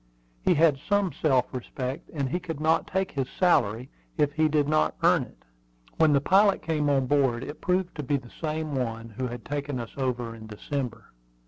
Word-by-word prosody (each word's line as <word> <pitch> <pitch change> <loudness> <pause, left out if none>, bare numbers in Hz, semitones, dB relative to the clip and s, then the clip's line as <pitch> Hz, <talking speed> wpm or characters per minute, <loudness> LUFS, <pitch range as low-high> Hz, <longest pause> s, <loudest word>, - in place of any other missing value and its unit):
He - - +4
had 150 -3 +4
some 205 -3 +2
self 135 -5 +1
respect, 130 +2 -5
and 140 -4 -2
he 175 +7 -1
could 165 -4 -6
not 160 +1 +2
take 190 0 -1
his 135 -2 -2
salary 125 - +2 0.3
if 145 -2 +2
he 155 +1 +3
did 145 -1 +2
not 155 +1 +2
earn - - +5
it. - - -11 0.5
When 160 -2 +5
the 140 - +5
pilot 195 +7 +4
came 150 -3 0
on 135 -2 +2
board 130 -3 +2
it 150 +2 -8
proved 180 0 0
to - - -2
be 140 +2 +1
the 125 -3 -12
same 155 -1 -2
one 115 -3 -3
who 125 +4 -4
had 120 -1 -7
taken 145 -2 -3
us 115 - -6
over 125 -3 -2
in 110 -1 -11
December. 115 +1 -5
140 Hz, 200 wpm, -27 LUFS, 125-155 Hz, 0.5 s, earn